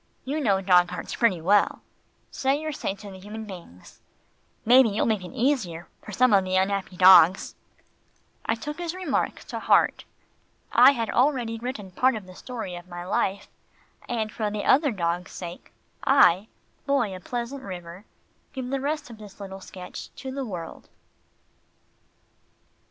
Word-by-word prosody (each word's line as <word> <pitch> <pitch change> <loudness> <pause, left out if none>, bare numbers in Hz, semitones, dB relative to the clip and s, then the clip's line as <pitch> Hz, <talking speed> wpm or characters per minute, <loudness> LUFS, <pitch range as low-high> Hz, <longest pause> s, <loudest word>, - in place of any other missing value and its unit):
"You 285 +4 -2
know 200 -9 +2
dog 180 -2 +4
hearts 180 - -6
pretty 200 -8 +2
well. 200 +5 +2 0.5
Say 270 +2 0
your 310 0 -4
say 195 -8 -3
to 200 0 -11
the 190 - -11
human 215 +3 -8
beings. 175 - -12 0.6
Maybe 250 +1 +7
you'll 205 +1 0
make 215 -4 0
it - - -7
easier 220 - -1
for - - -10
some 255 +3 +3
of 195 -1 +5
the 185 0 -2
unhappy 190 -1 0
dogs." 185 -1 +7 0.9
I 225 - 0
took 295 +7 -7
his 345 0 -4
remark 365 -7 -2
to - - -6
heart. - - +2 0.7
I 280 - +7
had 230 -4 -2
already 245 -3 +1
written 225 -6 -6
part 255 +7 +2
of 210 -3 -7
the 185 - -13
story 220 -3 -7
of 175 0 -9
my 175 0 -7
life, 195 +1 -1 0.6
and 220 -3 -2
for 215 -2 -2
the 205 0 -4
other 290 +2 +4
dogs' 175 -4 -2
sake, 175 -1 -8 0.3
I, 220 -8 +5 0.4
Boy 240 -9 +1
of 185 - -11
Pleasant 245 +3 -4
River, 180 -1 -9 0.5
give 260 -2 -5
the 275 -1 -1
rest 295 -2 -3
of 220 - -12
this 205 -2 -13
little 195 -1 -8
sketch 185 -1 -9
to 265 0 -7
the 270 +1 -4
world. 180 -8 -7
210 Hz, 160 wpm, -25 LUFS, 185-255 Hz, 0.9 s, Maybe